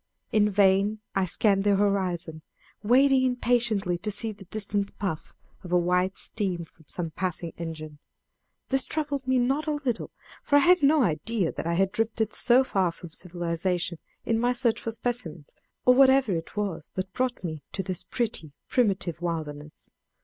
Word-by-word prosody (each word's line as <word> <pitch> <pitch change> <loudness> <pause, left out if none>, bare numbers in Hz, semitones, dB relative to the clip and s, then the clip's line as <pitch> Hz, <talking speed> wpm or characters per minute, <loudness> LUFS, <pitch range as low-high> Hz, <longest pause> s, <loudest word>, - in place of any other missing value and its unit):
In 210 -1 +3
vain 200 +1 +3 0.2
I 195 -1 +1
scanned 195 +2 +2
the 205 -1 +3
horizon, 185 -5 0 0.4
waiting 260 +4 +4
impatiently 235 -7 +1
to 210 - -3
see 220 +2 +1
the 200 -2 -12
distant 200 0 -2
puff 185 -6 -4 0.3
of 180 - -9
white 180 +2 +2
steam 185 -6 -2
from 160 0 -19
some 165 0 -4
passing 175 -1 -3
engine. 155 -3 -6 0.7
This 270 0 +2
troubled 285 -4 -2
me 260 0 +3
not 270 +5 +1
a 305 - +1
little, 270 -6 -2 0.3
for 285 - +1
I - - +8
had 360 0 +6
no 290 0 +5
idea 180 +2 0
that - - -5
I 170 - 0
had 190 +2 +2
drifted 225 0 -1
so 255 +2 +4
far 190 -8 +1
from 165 0 -12
civilization 175 0 -2 0.3
in 225 -1 +1
my 245 +1 +2
search 240 -2 0
for - - -3
specimens, 220 -10 -3 0.3
or 250 - +7
whatever 265 -5 +5
it 165 +4 -6
was 185 -7 -3
that 185 0 -4
brought 255 -3 -1
me 155 -4 -4
to 190 - -2
this 180 -1 -4
pretty, 195 - -3 0.2
primitive 190 -8 0
wilderness. 155 -3 -5
195 Hz, 165 wpm, -27 LUFS, 175-240 Hz, 0.7 s, I